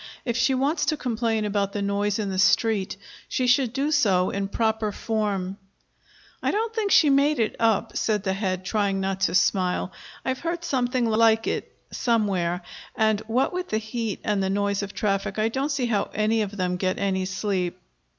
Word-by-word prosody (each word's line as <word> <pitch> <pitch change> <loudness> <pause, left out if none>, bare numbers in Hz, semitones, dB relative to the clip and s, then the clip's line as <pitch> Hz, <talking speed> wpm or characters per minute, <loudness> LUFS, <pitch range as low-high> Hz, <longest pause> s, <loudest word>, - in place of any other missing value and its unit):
If 235 -3 -1
she 265 +2 +2
wants 295 +4 +1
to 310 - +1
complain 230 -4 -1
about 200 -1 -1
the 205 - -2
noise 200 0 0
in 205 -3 -2
the 185 - -2
street, 210 -1 +2 0.3
she 255 - 0
should 250 -1 +3
do 275 +4 -1
so 195 -11 +3
in 200 0 -2
proper 220 0 0
form." 200 -4 -2 0.8
"I - - 0
don't 450 +2 -1
think 440 -3 -1
she 305 -6 +6
made 280 +2 +3
it 220 - 0
up," 225 -3 +1
said 210 -3 0
the 190 -2 0
Head, 190 -2 -2
trying 200 -1 0
not 190 0 -2
to 190 - +2
smile. 180 0 +1 0.3
"I've 260 0 -1
heard 340 +1 -3
something 250 -5 0
like 225 0 +3
it - - -2 0.2
somewhere, 190 -7 0 0.3
and, 220 -1 +2
what 250 +8 +1
with 360 0 -3
the 215 - +1
heat 220 -1 -4
and 210 -2 0
the 190 - 0
noise 200 0 0
of 200 -1 -5
traffic, 195 -1 -1
I 215 +1 +2
don't 270 +5 -1
see 280 -4 0
how 215 -4 0
any 215 +1 +2
of 205 0 -4
them 180 -1 -1
get 185 0 -1
any 190 -1 0
sleep." 190 -2 -2
215 Hz, 190 wpm, -25 LUFS, 195-245 Hz, 0.8 s, she